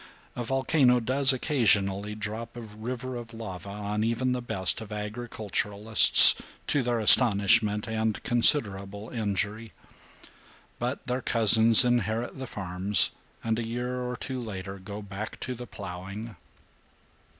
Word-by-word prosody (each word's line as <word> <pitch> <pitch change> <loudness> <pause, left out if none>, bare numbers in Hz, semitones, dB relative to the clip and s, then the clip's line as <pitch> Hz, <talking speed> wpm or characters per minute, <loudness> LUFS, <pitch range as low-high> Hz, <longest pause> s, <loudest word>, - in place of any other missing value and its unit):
A - - -6
volcano 130 0 +1
does 130 +3 +3
occasionally 105 -7 -1
drop 110 +3 -7
a - - -8
river 120 +4 -8
of 115 -1 -11
lava 100 -4 -9
on 105 +1 -5
even 115 +3 -2
the 125 0 -3
best 95 -4 -2
of 110 -1 -11
agriculturists, 105 -1 +4 0.3
to 145 - -1
their 120 -1 -2
astonishment 105 -1 +4
and 110 -1 -4
considerable 105 -5 +1
injury, 105 0 -4 1.1
but 125 +4 -5
their 125 0 -4
cousins 115 +1 +6
inherit 120 +1 -2
the 130 - -7
farms 95 -1 0 0.3
and 115 0 -2
a - - -4
year 125 +2 -5
or 125 0 -5
two 130 0 -7
later 100 -3 -8
go 100 +2 -10
back 100 +2 -9
to 130 - -5
the 125 0 -10
plowing. 100 +3 -10
110 Hz, 130 wpm, -25 LUFS, 105-120 Hz, 1.1 s, cousins